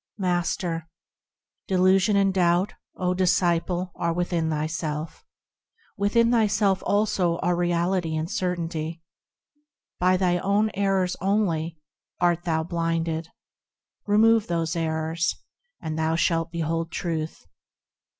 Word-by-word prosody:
Master. 175 -3 -1 0.8
Delusion 190 +2 +3
and 195 -1 +3
doubt, 180 +1 +2 0.2
O 180 -1 0
disciple! 180 0 +1
are 170 - -1
within 170 -1 -1
thyself; 155 0 -3 0.7
Within 230 +3 +2
thyself, 205 -4 +2
also, 200 -5 +1
are 180 0 +2
reality 175 -1 0
and 155 +1 -2
certainty. 170 -3 -3 1.0
By 185 +1 +3
thine 175 -2 +1
own 205 +2 +2
errors 195 -2 +1
only 175 -5 0 0.4
art 175 -1 +1
thou 160 -2 +1
blinded, 165 -1 -2 0.8
Remove 220 +1 +4
those 165 -1 -1
errors, 160 0 -1 0.4
and 155 0 -4
thou 160 +1 +1
shalt 165 0 +1
behold 165 0 -2
Truth. 160 - -4
175 Hz, 105 wpm, -25 LUFS, 165-190 Hz, 1.0 s, Remove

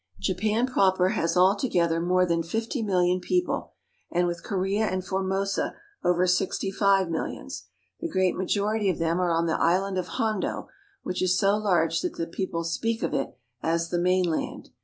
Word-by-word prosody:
Japan 210 +5 +1
proper 190 -7 +3
has 165 -1 0
all 185 +2 +5
together 170 -8 +1
more 180 +1 +3
than 170 -1 +1
fifty 225 - -3
million 180 -3 +2
people, 360 - -1 0.4
and 175 +1 +1
with 170 -1 -3
Korea 200 +2 0
and 185 0 -2
Formosa 190 +1 -1 0.3
over 180 +1 +3
sixty 185 +2 0
five 195 -1 +3
millions. 165 -1 -5 0.3
The - - -3
great 185 - +1
majority 205 +2 0
of 180 - 0
them 165 +1 0
are 180 - +1
on 165 0 +2
the 160 - 0
island 185 +3 +2
of 180 - -3
Hondo, 215 -3 -1 0.3
which 180 - -3
is 185 0 +2
so 200 0 +3
large 175 -6 +1
that - - -3
the 165 - -2
people 170 0 -3
speak 225 +7 -1
of - - -1
it 135 - -2 0.2
as 165 0 0
the 175 - +1
mainland. 180 -2 0
185 Hz, 175 wpm, -26 LUFS, 170-200 Hz, 0.4 s, all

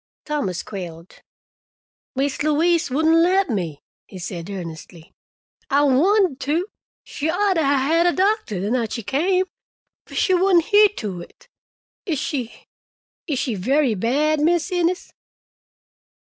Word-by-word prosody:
Thomas 280 - -2
quailed. 175 -3 -9 0.9
"Mis' 275 +1 -1
Louise 325 +3 +2
wouldn' 320 +5 +3
let 370 -2 +2
me," 170 -9 -3 0.2
he 190 - -11
said 180 -1 -6
earnestly. 170 -3 -9 0.6
"I 285 +1 +3
wanted 330 +3 +3
to. 315 +7 0 0.4
She 300 +2 -4
ought 390 +4 +2
to 330 - +1
'a' - - +1
had 285 +5 +2
a - - +4
doctor 380 - 0
the 200 +4 -2
night 240 -3 -1
she 230 - -4
came, 365 - +1 0.6
but - - -9
she 375 - +2
wouldn' 365 -1 +4
hear 415 +4 +5
to 195 -6 -5
it. - - -15 0.6
Is 325 -5 0
she—is 265 +2 -7
she 245 -2 -1
very 255 +6 +1
bad, 285 +9 +1
Mis' 335 +3 +1
Innes?" 355 0 -1
290 Hz, 135 wpm, -21 LUFS, 215-345 Hz, 0.9 s, hear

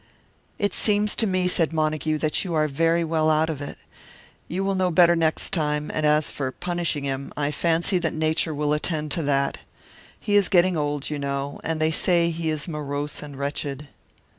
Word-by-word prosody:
"It 205 -2 0
seems 210 -1 +2
to 225 - +3
me," 185 -1 +1
said 170 -3 +2
Montague, 155 0 0
"that 155 0 +1
you 175 -4 -3
are 155 0 +2
very 165 +4 +1
well 160 -1 +1
out 155 +1 +2
of 145 -3 -6
it. 145 - -6 0.7
You 185 +3 -2
will 195 0 0
know 185 -1 +1
better 170 0 +5
next 160 -1 0
time; 150 -3 -1
and 155 -1 +1
as 150 0 +2
for 130 -2 -3
punishing 175 -3 -2
him, 135 0 -3
I 145 0 0
fancy 170 +4 +1
that 165 -2 -1
Nature 155 0 0
will 150 0 0
attend 150 -1 -2
to 170 - 0
that. 140 -2 0 0.6
He 205 - 0
is 205 -2 +4
getting 185 -1 +4
old, 145 -1 -2
you 150 - -3
know; 140 0 -3
and 160 -1 -2
they 155 0 +2
say 170 +1 +2
he 165 0 -2
is 155 +1 -2
morose 145 -2 -4
and 145 -2 -9
wretched." 140 0 -4
155 Hz, 195 wpm, -24 LUFS, 150-170 Hz, 0.7 s, better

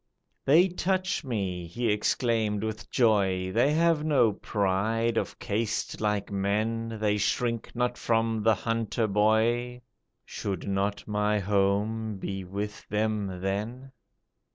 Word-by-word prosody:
"They 165 +7 +6
touch 185 0 -1
me," 95 - -3
he 115 +6 -1
exclaimed 105 0 0
with 110 -1 -5
joy, 95 -6 +2
"They 120 +8 +3
have 165 -1 +3
no 140 -8 +3
pride 110 +4 0
of - - -2
caste 110 +2 -2
like 105 -2 -1
men, 110 +3 -1
They 105 -1 +1
shrink 115 +3 -1
not 125 0 -1
from 115 -1 +1
the 110 0 +4
hunter 115 +2 -1
boy, 110 +4 +1 0.4
Should 95 -2 -4
not 100 +1 -1
my 105 0 +1
home 105 +2 0
be 95 0 -4
with 100 +3 -5
them 105 -3 -1
then? 110 +8 -3
110 Hz, 125 wpm, -28 LUFS, 100-115 Hz, 0.4 s, They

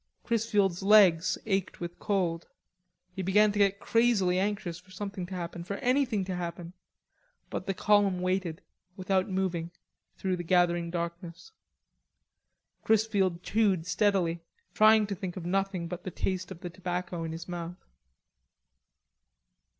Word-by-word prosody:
Chrisfield's 210 -6 +1
legs 195 -4 +5
ached 195 -3 -1
with 175 0 -6
cold. 175 -5 -1 0.7
He 190 - -3
began 205 +3 +4
to 205 - -3
get 200 0 +3
crazily 210 -6 +2
anxious 195 -3 -2
for 185 +1 -23
something 195 -1 -6
to 185 - -6
happen, 170 -1 -5
for 200 +3 -5
something 250 -6 +1
to 185 -1 -3
happen, 170 0 -5 0.8
but - - -4
the 195 - -1
column 200 -3 +3
waited, 185 -1 -2 0.3
without 190 +1 0
moving, 185 -3 -1 0.5
through 185 -1 -1
the 175 - -4
gathering 175 -1 +2
darkness. 170 - -5 1.3
Chrisfield 200 -5 +1
chewed 200 -7 +1
steadily, 180 -3 +1 0.3
trying 215 0 +6
to 200 - -4
think 190 -1 -6
of 175 - -6
nothing 190 -1 -1
but 180 +1 -6
the - - -4
taste 185 0 -3
of 185 -3 -9
the 175 - -6
tobacco 180 -1 -4
in 165 - -4
his 165 +1 -7
mouth. 175 0 -7
185 Hz, 140 wpm, -29 LUFS, 175-200 Hz, 1.3 s, trying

